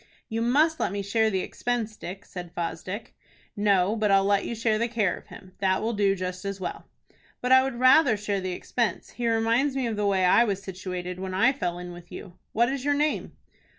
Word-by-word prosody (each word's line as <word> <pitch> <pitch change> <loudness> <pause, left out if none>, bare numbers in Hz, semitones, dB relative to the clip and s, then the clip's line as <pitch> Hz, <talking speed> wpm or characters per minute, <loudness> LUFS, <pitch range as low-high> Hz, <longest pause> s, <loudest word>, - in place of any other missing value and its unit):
"You 225 +1 -2
must 300 +7 +3
let - - 0
me 200 0 -3
share 220 +2 +2
the 190 -3 0
expense, 230 -1 -3
Dick," 195 0 -8
said 175 -2 -9
Fosdick. 180 +4 -5 0.4
"No, 205 -1 +2
but 215 -2 +1
I'll 195 0 +4
let 200 0 +2
you 235 - -3
share 220 -1 +1
the 235 - +1
care 220 -5 0
of - - -14
him. 185 - -13
That 190 -1 +2
will 230 +1 0
do 200 -2 +2
just 185 -1 -5
as 200 0 -4
well." 180 - -5 0.5
"But 250 - -2
I 260 0 +8
would 265 -1 -2
rather 255 -2 +6
share 205 -1 -2
the 185 0 -3
expense. 225 +1 -2
He 240 -1 -1
reminds 230 +5 +2
me 265 -2 0
of 225 -3 -2
the 210 -1 +1
way 190 -2 +2
I 180 +6 +6
was 200 -4 -1
situated 180 -1 -6
when 190 0 -4
I 230 +8 +4
fell 175 -10 -3
in 180 0 -7
with 175 0 -12
you. 180 - -9 0.2
What 235 +2 +2
is 275 -2 -4
your 290 0 +2
name?" 300 +1 -1
205 Hz, 225 wpm, -26 LUFS, 185-235 Hz, 0.5 s, I